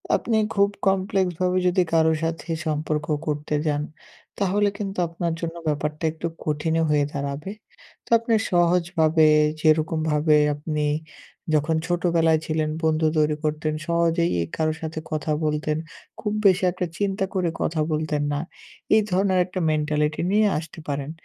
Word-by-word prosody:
আপনি 225 -2 0 0.2
খুব 200 0 +4 0.2
কমপ্লেক্স 190 -1 +1
ভাবে 180 0 +2
যদি 180 +1 +3
কারো 160 0 +4
সাথে 165 +1 -3 0.2
সম্পর্ক 150 0 -1 0.2
করতে 150 0 -1
যান, 145 0 +1 0.6
তাহলে 205 +1 +2
কিন্তু 195 -2 -5
আপনার 170 0 -3
জন্য 165 0 -4
ব্যাপারটা 150 +1 -2
একটু 160 +1 -4 0.2
কঠিনও 160 +2 0
হয়ে 145 -1 +3
দাঁড়াবে। 140 +5 -4 0.5
তো - - -19
আপনি 230 0 -1 0.2
সহজভাবে, 170 -2 +3 0.3
যেরকম 155 0 +2
ভাবে 150 +1 +3 0.2
আপনি 150 0 -2 0.7
যখন 155 +2 +2
ছোটবেলায় 170 -2 +2
ছিলেন 155 -1 -1
বন্ধু 160 0 +2
তৈরি 150 0 +2
করতেন, 155 0 -1
সহজেই 170 0 +2
এ - - +1
কারো 155 0 0
সাথে 160 0 -4
কথা 155 0 -2
বলতেন, 150 0 0 0.4
খুব 210 - -2
বেশি 190 0 +5
একটা 180 0 -3
চিন্তা 195 -1 0
করে 180 -3 0
কথা 155 -1 0
বলতেন 150 -1 -1
না। 145 - -1 0.6
এই 220 - +5
ধরনের 190 0 +2
একটা 185 0 -5
মেন্টালিটি 150 0 0
নিয়ে 210 +1 +4
আসতে 160 +1 -7
পারেন। 140 +1 -3
160 Hz, 145 wpm, -24 LUFS, 150-180 Hz, 0.7 s, বেশি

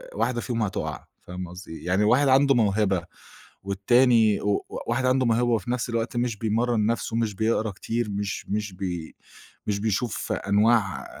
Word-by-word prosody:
واحدة 120 -2 0
فيهم 115 -3 -2
هتقع، 100 -3 -4 0.2
فاهمة 90 0 -7
قصدي 90 0 -10
إيه؟ 80 - -10
يعني 95 +3 +2
واحد 130 +6 +4
عنده 135 +1 +5
موهبة، 100 -5 +2 0.6
والتاني 110 +2 +3
و 100 -1 0 0.2
واحد 120 +3 0
عنده 130 0 +2
موهبة 120 +1 +2
وفي 115 -1 0
نَفْس 125 -1 -2
الوقت 115 +1 -2
مش 120 -2 -1
بيمرن 115 +1 +1
نَفسه، 115 0 -1
مش 115 -3 -1
بيقرا 110 0 0
كتير، 115 +3 -3
مش 100 0 -4
مش 105 -1 -2
بي 90 -4 -5 0.5
مش 100 -1 0
بيشوف 110 +1 -2
أنواع 105 -1 +2
110 Hz, 160 wpm, -25 LUFS, 100-120 Hz, 0.6 s, عنده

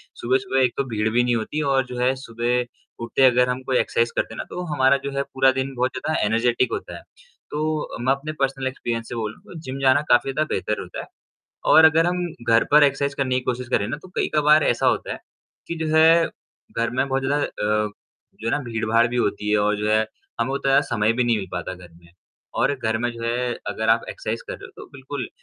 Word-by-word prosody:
सुबह-सुबह 130 +2 0
एक 125 - +2
तो 140 - +1
भीड़ 110 -1 0
भी 120 +2 +2
नहीं 120 -1 +1
होती 115 +7 -2
और 135 -2 +2
जो 125 0 -8
है 125 +1 +3
सुबह 120 -1 -1 0.4
उठते 115 +3 -1
अगर 125 0 +4
हम 125 +1 -2
कोई 130 -1 +1
एक्सरसाइज़ 115 0 +1
करते - - -1
हैं - - -10
ना, - - -3
तो 180 - -5
हमारा 135 -1 +4
जो 140 - -3
है 140 - +1
पूरा 135 -1 +2
दिन 130 +1 -3
बहुत 125 +1 0
ज़्यादा 155 - -1
एनर्जेटिक 120 +3 +1
होता - - -5
है। - - -12 0.5
तो 155 0 -2
मैं 130 +2 +2
अपने 140 +3 -5
पर्सनल 135 -1 0
एक्सपीरियंस 120 -3 -4
से - - -5
बोलूँ 110 -2 -5
तो 170 - -10
जिम 135 -3 -6
जाना 135 +1 +4
काफ़ी 120 +2 +4
ज़्यादा 155 +3 0
बेहतर 105 - -1
होता - - -8
है। - - -9 0.6
और 160 - +8
अगर 160 +1 +5
हम 180 0 0 0.2
घर 115 0 +5
पर 150 0 +7
एक्सरसाइज़ 140 0 +1
करने 130 -2 0
की 130 - +1
कोशिश 125 0 -2
करें 105 -5 +1
ना - - -3
तो - - -13
कई-कबार 150 0 +3
ऐसा 120 - +1
होता - - 0
है - - -5 0.5
कि 170 - -3
जैसे 160 +1 +5 0.6
घर 115 - +1
में 130 +3 0
बहुत 135 0 -1
ज़्यादा 145 +2 +1
अ, 105 0 -1 0.5
जो 110 - -3
है - - +1
ना - - +1
भीड़-भाड़ 115 -1 +1
भी 120 +1 -3
होती 105 -2 -1
है 105 - +3
और 105 0 +2
जो 105 +1 -1
है 110 0 +3 0.3
हमें 115 +3 0
उतना 135 0 +3
समय 110 0 +2
भी 125 +1 +1
नहीं 120 -2 +2
मिल 95 -2 -5
पाता 90 +1 -4
घर 90 -1 -13
में 85 0 -20 0.5
और - - +3
घर 110 -4 -1
में 120 +1 -1
जो 115 -1 -8
है 120 +1 -1
अगर 110 0 -1
आप 115 +1 +3
एक्सरसाइज़ 115 +1 -4
कर - - -4
रहे - - -10
हो - - -18
तो - - -10
बिल्कुल, 135 -2 -6
125 Hz, 235 wpm, -23 LUFS, 115-140 Hz, 0.6 s, और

